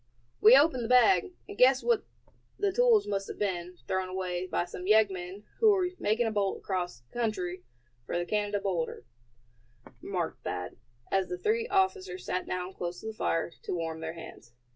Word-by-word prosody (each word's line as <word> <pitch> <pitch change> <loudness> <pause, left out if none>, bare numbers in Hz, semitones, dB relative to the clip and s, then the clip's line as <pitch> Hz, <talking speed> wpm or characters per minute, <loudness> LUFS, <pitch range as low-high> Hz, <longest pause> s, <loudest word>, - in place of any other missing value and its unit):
"We 230 +5 +9
opened 275 -4 +3
the - - -2
bag, 365 +10 +5 0.2
and 405 - -8
guessed 260 -2 +5
that 470 -3 +2 0.6
the 405 -1 +1
tools 465 0 +4
must 195 -1 -2
have - - -7
been 180 -3 -3
thrown 190 0 -1
away 185 -1 -3
by 175 - -1
some 180 +1 -8
yeggmen 195 -2 +2 0.2
who 445 -1 +6
were 375 -3 +3
making 220 +3 +1
a 225 - 0
bolt 200 -2 0
across 175 -10 -4
country 200 -7 -2 0.5
for - - -1
the 175 - -1
Canada 205 +1 -1
border," 175 -10 -3 1.0
remarked 180 -4 -3
Thad, 90 0 -5 0.3
as 195 -1 +2
the 180 - -4
three 455 - 0
officers 380 -2 0
sat 185 - -2
down 185 +1 -3
close 175 -1 -5
to - - -12
the 220 - -4
fire 165 -5 -1
to - - -3
warm 165 -1 -3
their 160 0 -5
hands. 140 -7 -12
195 Hz, 180 wpm, -29 LUFS, 180-260 Hz, 1.0 s, We